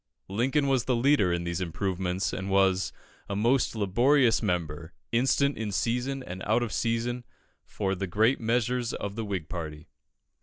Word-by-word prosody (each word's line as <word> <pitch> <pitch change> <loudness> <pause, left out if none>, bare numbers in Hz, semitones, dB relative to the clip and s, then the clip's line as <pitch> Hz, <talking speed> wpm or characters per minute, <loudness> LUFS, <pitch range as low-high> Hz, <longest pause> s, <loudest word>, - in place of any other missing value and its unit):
Lincoln 130 +8 +1
was 135 -3 +1
the 125 - +1
leader 120 -6 +3
in 85 0 -1
these 85 +1 -3
improvements, 90 +1 -2
and 95 +1 -4
"was 95 -1 +3 0.4
a 100 - -2
most 120 +5 +2
laborious 120 +5 +3
member, 85 -5 -2 0.2
instant 135 +3 +2
in 110 -2 -2
season 125 +6 -1
and 95 -2 -7
out 115 +3 +3
of 115 - -4
season 120 +1 -1 0.4
for 95 -2 -2
the 95 0 -3
great 110 +8 +2
measures 120 +1 0
of 100 -1 -4
the 115 +2 -4
Whig 95 -6 -3
party." 80 -3 -6
105 Hz, 160 wpm, -28 LUFS, 95-120 Hz, 0.4 s, leader